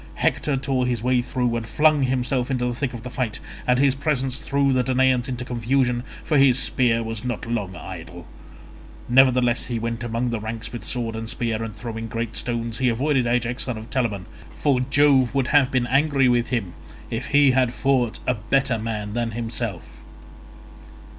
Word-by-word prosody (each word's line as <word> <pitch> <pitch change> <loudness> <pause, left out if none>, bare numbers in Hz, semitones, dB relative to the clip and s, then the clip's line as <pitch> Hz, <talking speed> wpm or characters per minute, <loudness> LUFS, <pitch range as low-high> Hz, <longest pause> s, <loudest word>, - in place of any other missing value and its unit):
Hector 145 -3 0
tore 130 -1 0
his 120 -3 -2
way 125 0 +2
through 125 -1 -1
and 115 -1 -3
flung 155 -1 +3
himself 130 0 0
into 125 -2 0
the 125 - -1
thick 125 0 -3
of 115 - -8
the 125 - -6
fight, 120 -5 -3 0.3
and 125 0 +4
his 135 0 +4
presence 135 -2 -1
threw 140 -1 +1
the 130 - +3
Danaans 130 -1 +2
into 125 -1 -4
confusion, 125 +1 0 0.2
for 150 -3 +2
his 135 -2 +5
spear 120 -3 +2
was 115 -1 -5
not 125 -1 -3
long 105 -5 -3
idle; 80 - -9 0.8
nevertheless 125 -1 +4
though 120 - -3
he - - -1
went 115 +1 -3
among 120 +1 -2
the 115 - -2
ranks 110 +2 -6
with 120 - -6
sword 115 -3 -3
and 110 0 -5
spear, 115 -2 -2
and 110 -2 -6
throwing 115 0 -6
great 115 0 -4
stones, 115 -1 -2
he 130 -1 +3
avoided 130 +1 +1
Ajax 120 +1 0
son 125 -4 -3
of 110 +2 -10
Telamon, 110 -8 -1 0.3
for 140 -4 +2
Jove 135 -1 +3
would 135 -3 +1
have 145 -4 +4
been 130 -3 +1
angry 135 +1 +3
with 120 -1 +2
him 115 -9 -2 0.4
if 115 +2 -3
he 145 -2 +5
had 130 -2 +2
fought 125 -3 +1
a 125 - +2
better 125 +2 0
man 105 -2 -4
than 115 -1 -2
himself. 115 -5 -4
125 Hz, 190 wpm, -23 LUFS, 115-130 Hz, 0.8 s, his